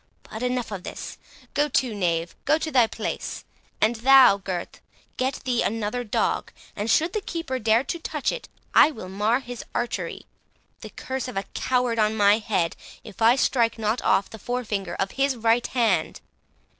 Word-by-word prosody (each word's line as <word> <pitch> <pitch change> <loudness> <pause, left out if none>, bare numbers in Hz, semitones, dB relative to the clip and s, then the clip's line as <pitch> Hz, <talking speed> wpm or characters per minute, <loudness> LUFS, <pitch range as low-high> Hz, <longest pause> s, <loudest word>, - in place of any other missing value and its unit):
But 220 - -8
enough 250 -2 -1
of 195 -3 -5
this. - - -8 0.3
Go 295 +1 +1
to, 255 -3 +1
knave, 170 -4 -1
go 300 +2 +4
to 315 0 -4
thy 245 -5 +5
place—and 220 +1 -4
thou, 260 -3 +7
Gurth, 185 -3 -5 0.3
get 260 +1 -1
thee 245 -2 0
another 225 +3 -1
dog, 215 - -1 0.2
and 210 +2 -3
should 325 +9 +3
the 430 - -1
keeper 330 -8 -4
dare 225 +1 +3
to 335 +5 -4
touch 305 -3 -2
it, - - -7 0.2
I - - +7
will 220 -11 -8
mar 210 +6 +1
his 245 -2 -7
archery; 240 0 -3 0.5
the - - -9
curse 260 0 -5
of 250 - -6
a 195 - 0
coward 250 -2 0
on 215 0 +2
my 205 +1 +5
head, 190 -6 -1 0.3
if 205 - -12
I 230 +2 +6
strike 235 -4 +2
not 220 +2 -1
off 195 - +2
the 220 - -11
forefinger 205 -7 -3
of 195 +1 -2
his 275 0 +1
right 230 +1 +2
hand! 240 -3 +1
235 Hz, 175 wpm, -25 LUFS, 210-260 Hz, 0.5 s, thou